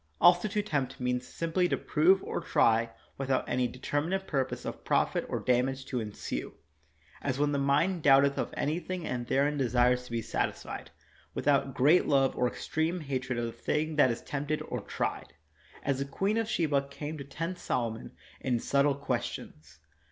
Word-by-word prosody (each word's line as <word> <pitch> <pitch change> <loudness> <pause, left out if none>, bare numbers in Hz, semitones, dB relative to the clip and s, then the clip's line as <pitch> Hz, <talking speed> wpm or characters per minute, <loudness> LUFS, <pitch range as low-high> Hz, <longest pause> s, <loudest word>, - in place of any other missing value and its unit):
Also 175 +3 +6
to 210 0 -1
tempt 145 -10 -2
means 125 0 -1
simply 170 +2 0
to - - +1
prove 185 +5 +3
or - - -3
try 115 -7 +3 0.3
without 135 -1 0
any 125 0 +1
determinate 150 +10 -2
purpose 135 -6 -2
of - - -6
profit - - +1
or - - -1
damage 130 +2 +1
to 125 - -2
ensue; 105 - -5 0.7
as 130 -2 -1
when 145 0 +2
the 140 - 0
mind 155 +6 +2
doubteth 140 0 +5
of - - -2
anything 175 +3 -2
and 120 -1 -3
therein 145 +3 +2
desires 125 0 +2
to - - -12
be 115 - 0
satisfied, 115 - -3 0.5
with - - -4
out 140 -2 +3
great 150 +8 +5
love 135 -2 +3
or 125 - +2
extreme 160 +7 -2
hatred 130 -3 -2
of 120 - 0
the 115 - -3
thing 155 +5 -1
that 145 -3 +5
is 115 - -3
tempted 145 +2 -2
or - - -4
tried, - - -4 0.5
as 135 -1 0
the 140 - -1
Queen 195 +10 0
of 225 -1 -2
Sheba 145 -9 +1
came 145 +2 -6
to - - -5
tempt 165 +6 -5
Solomon 115 -9 -2 0.3
in 125 -3 0
subtle 140 +3 +2
questions. 80 - -4
140 Hz, 175 wpm, -30 LUFS, 125-160 Hz, 0.7 s, Also